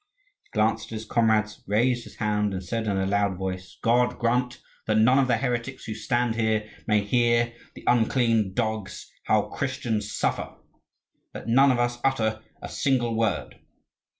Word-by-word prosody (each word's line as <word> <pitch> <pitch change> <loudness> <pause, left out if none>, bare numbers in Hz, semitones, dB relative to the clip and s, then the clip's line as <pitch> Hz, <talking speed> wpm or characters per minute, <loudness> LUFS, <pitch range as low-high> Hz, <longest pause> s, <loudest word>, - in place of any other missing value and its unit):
He - - -31
glanced 110 0 +1
at 115 - -7
his 110 0 -6
comrades, 110 -2 +1
raised 120 +4 +1
his - - -13
hand, 105 -2 0
and 95 - -4
said 110 +5 -3
in 100 -2 0
a 95 - 0
loud 100 -1 +1
voice: 95 -1 -5
"God 120 +2 +2
grant 125 +1 0 0.3
that 110 -1 +2
none 125 +5 +5
of 135 - +3
the 120 -2 +2
heretics 125 +1 -3
who 110 - -4
stand 120 +2 0
here 110 -1 0 0.2
may 105 -1 +3
hear, 120 +1 +2 0.2
the - - -11
unclean 115 -4 +2
dogs, 110 -4 -3
how - - +3
Christians 115 -6 -3
suffer! - - -2 0.8
Let - - -7
none 135 +4 +5
of 125 - +1
us 120 0 0
utter 110 -5 +1 0.2
a - - -4
single 125 -5 0
word." 115 0 -1
115 Hz, 170 wpm, -26 LUFS, 105-120 Hz, 0.8 s, none